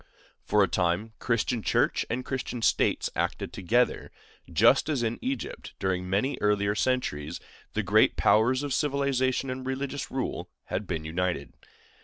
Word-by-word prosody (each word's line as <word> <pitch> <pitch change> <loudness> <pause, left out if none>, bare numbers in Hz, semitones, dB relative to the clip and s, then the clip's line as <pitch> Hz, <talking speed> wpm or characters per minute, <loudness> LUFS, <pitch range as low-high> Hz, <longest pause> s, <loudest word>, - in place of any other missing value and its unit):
For 105 -1 +3
a - - +3
time 90 +7 0
Christian 115 0 0
Church - - +1
and 125 +2 -2
Christian 125 -3 -4
States - - +2
acted - - -2
together, 120 +7 +1 0.4
just - - +4
as 140 -6 0
in 115 0 -1
Egypt, 130 -2 -4
during 90 -1 -1
many 105 +9 0
earlier 105 -1 +2
centuries, 85 - -1 0.3
the - - 0
great - - +4
powers 125 +5 +3
of 145 -2 -2
civil 140 -1 0
and 130 -1 0
religious 135 +1 -3
rule 130 - -3
had 100 +1 -4
been 80 -3 -3
united. 85 -2 -2
115 Hz, 145 wpm, -28 LUFS, 95-130 Hz, 0.4 s, just